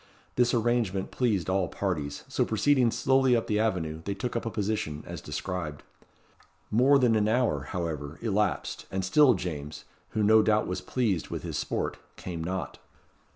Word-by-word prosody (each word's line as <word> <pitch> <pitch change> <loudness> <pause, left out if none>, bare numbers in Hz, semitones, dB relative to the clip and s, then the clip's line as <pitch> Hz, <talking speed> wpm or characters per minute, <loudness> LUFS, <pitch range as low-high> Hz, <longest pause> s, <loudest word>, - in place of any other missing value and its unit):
This 120 -1 +3
arrangement 115 -5 0
pleased 110 -9 0
all 95 -1 +1
parties, 75 -9 -3
so - - +1
proceeding 125 +2 +3
slowly 130 +2 +3
up 115 - 0
the 105 -1 0
avenue, 85 -8 -1
they 100 - -2
took 120 +5 -4
up 115 - -2
a - - 0
position 100 -9 -2
as - - -7
described. 75 0 -4 0.9
More 130 +6 +5
than 125 -4 +3
an 105 -1 +2
hour, 110 - +1
however, 80 -4 -4
elapsed, 105 -3 -1
and 95 -1 -2
still 130 +5 +5
James, 75 -5 -5 0.3
who 105 - +3
no 110 +1 +6
doubt 110 0 +2
was 90 - -3
pleased 110 -10 -1
with - - -5
his - - -3
sport, - - -2 0.2
came 85 -3 -5
not. 95 +3 -4
100 Hz, 165 wpm, -28 LUFS, 85-115 Hz, 0.9 s, no